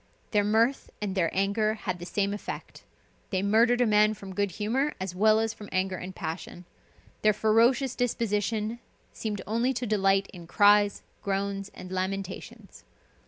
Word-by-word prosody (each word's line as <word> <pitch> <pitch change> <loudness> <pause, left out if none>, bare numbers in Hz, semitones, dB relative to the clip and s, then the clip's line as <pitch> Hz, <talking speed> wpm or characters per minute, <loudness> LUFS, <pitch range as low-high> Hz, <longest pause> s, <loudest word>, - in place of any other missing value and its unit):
Their 210 -2 +3
mirth 225 +6 +2
and 205 -2 -3
their 175 -4 +1
anger 210 +3 +1
had 185 -5 -4
the 175 - -7
same 200 0 0
effect. 205 - -7 0.5
They 190 -1 -1
murdered 230 +4 +4
a - - +5
man 215 0 +4
from 195 -2 -9
good 200 +1 0
humor, 250 - -1
as 190 -1 -4
well 215 +3 +4
as 225 0 0
from 210 -2 -11
anger 185 0 0
and 185 0 -7
passion. 170 +2 -6 0.6
Their 215 0 +4
ferocious 230 +5 +3
disposition 225 -2 -1 0.3
seemed 210 -3 -4
only 235 +5 +1
to 250 0 -3
delight 195 -2 +2
in 175 -3 -10
cries, 205 +2 +4 0.2
groans, 195 0 -2
and 185 0 -9
lamentations. 190 0 -5
205 Hz, 160 wpm, -28 LUFS, 195-220 Hz, 0.6 s, a